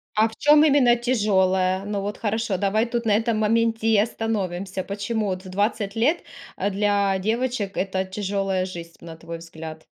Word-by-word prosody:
А 220 +1 +4
в 220 - -14
чём 300 0 +5
именно 275 -5 +5
тяжёлая? 190 -6 +1
Ну 205 -1 -2
вот 205 +1 -4
хорошо, 220 -3 -1
давай 205 +3 +1
тут 235 -1 -3
на 210 - +3
этом 225 -1 0
моменте 225 +1 +1
и 220 -2 +4
остановимся. 195 -4 -2
Почему 210 +2 -2
вот 185 0 -4
в - - -9
20 205 +1 -1
лет, 295 +10 +2 0.4
э, 200 +2 0
для 200 -1 +1
девочек 220 0 -2
это 190 0 -1
тяжёлая 195 -1 -2
жизнь, 170 -2 -8
на 165 -1 -10
твой 165 0 -8
взгляд? 160 -1 -9
205 Hz, 175 wpm, -23 LUFS, 190-225 Hz, 0.4 s, чём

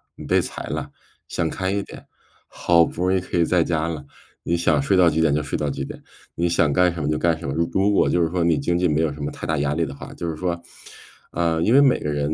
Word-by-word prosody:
你 - - -10
被 - - +3
裁 - - -6
了， - - -4 0.4
想 85 -2 -1
开 95 +2 -2
一 100 0 0
点， - - -12 0.4
好 85 -1 +3
不 85 - -5
容 95 - +2
易 - - +1
可 90 - -4
以 85 - +4
在 90 0 +2
家 80 -1 -1
了， 80 -3 -5 0.4
你 85 - 0
想 80 -4 +2
睡 85 +8 +1
到 90 -2 +6
几 80 0 0
点 80 -3 +3
就 75 - +1
睡 75 - -3
到 75 - -1
几 - - -4
点， - - -9 0.3
你 85 - 0
想 85 -3 +2
干 90 +2 +3
什 85 - -5
么 70 - -1
就 75 - 0
干 85 0 +1
什 85 - -7
么， 70 - -2
如 85 +1 +1
如 100 +2 +2
果 100 - +3
就 90 - +2
是 80 - +2
说 90 0 0
你 85 -2 +3
经 85 - 0
济 90 0 +2
没 75 -1 +1
有 80 -2 +1
什 75 - -10
么 70 - -3
太 - - -7
大 80 -1 0
压 70 0 0
力 85 +2 0
的 70 -2 -7
话”。 - - -10
就 85 - -4
是 80 - -4
说 85 0 -2 0.7
呃， 85 -1 0
因 110 - +3
为 140 - +7
每 135 -3 +4
个 75 - -3
人 75 +1 -1
85 Hz, 315 characters per minute, -22 LUFS, 75-85 Hz, 0.7 s, 为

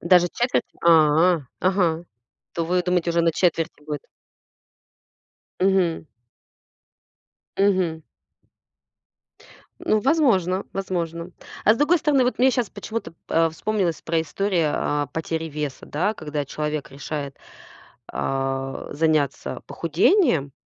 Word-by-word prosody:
удаже 175 0 +5
четверть? 245 +1 +1 0.2
А. 165 +1 +5 0.2
Ага, 180 -3 +1 0.5
то 165 - -1
вы 180 +2 +1
думаете, 180 -1 +1
уже 170 0 +2
на 165 0 +3
четверти 165 -3 0
будет. 150 -2 -5 1.6
Мгм. 185 -4 +2 1.5
Мгм. 185 -5 +2 1.8
Ну, 215 - +2
возможно 210 - +2
возможно. 170 -3 -3 0.3
А 215 - +7
с - - -4
другой 295 +5 +4
стороны, 295 -4 +2
вот 250 - 0
мне 260 +1 +5
щас 245 -5 -1
почему-то 210 -3 -5
п 165 - -29
а, 165 0 +3
вспомнилась 185 +1 -1
про 165 0 0
историю 170 -1 0
о 145 -1 -1
потери 160 +2 -3
веса, 150 -2 -5
да, 185 +8 -1
когда 150 -6 -4
человек 150 +1 -4
решает, 140 0 -5 0.8
а, 135 0 -2
заняться 150 -2 0
похудением. 165 - +2
170 Hz, 115 wpm, -23 LUFS, 155-195 Hz, 1.8 s, А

